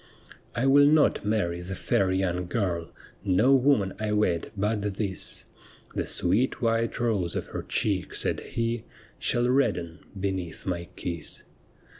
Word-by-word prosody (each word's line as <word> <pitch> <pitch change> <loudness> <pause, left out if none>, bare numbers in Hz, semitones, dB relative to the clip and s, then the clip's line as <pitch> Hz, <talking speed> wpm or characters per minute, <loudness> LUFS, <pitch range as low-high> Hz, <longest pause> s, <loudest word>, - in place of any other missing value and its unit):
' - - -19
I 120 - +1
will 145 +1 +7
not 150 0 +4
marry 100 -5 0
the 95 +2 -5
fair 95 0 +1
young 90 -2 0
girl, 90 -5 -1 0.3
No 105 +7 +4
woman 130 -8 +3
I 105 -1 -1
wed 90 -6 +1
but 105 +2 0
this; 100 -3 -4 0.5
The - - -2
sweet 105 +9 +1
white 115 -1 0
rose 105 -8 0
of - - -2
her - - -2
check,' 100 -4 -1
said - - -1
ho, 115 0 +1 0.2
' - - -25
Shall 120 0 +2
redden 100 - +1 0.2
beneath 95 -3 -3
my 85 -2 -2
kiss. 85 -2 -5
100 Hz, 150 wpm, -27 LUFS, 90-115 Hz, 0.5 s, will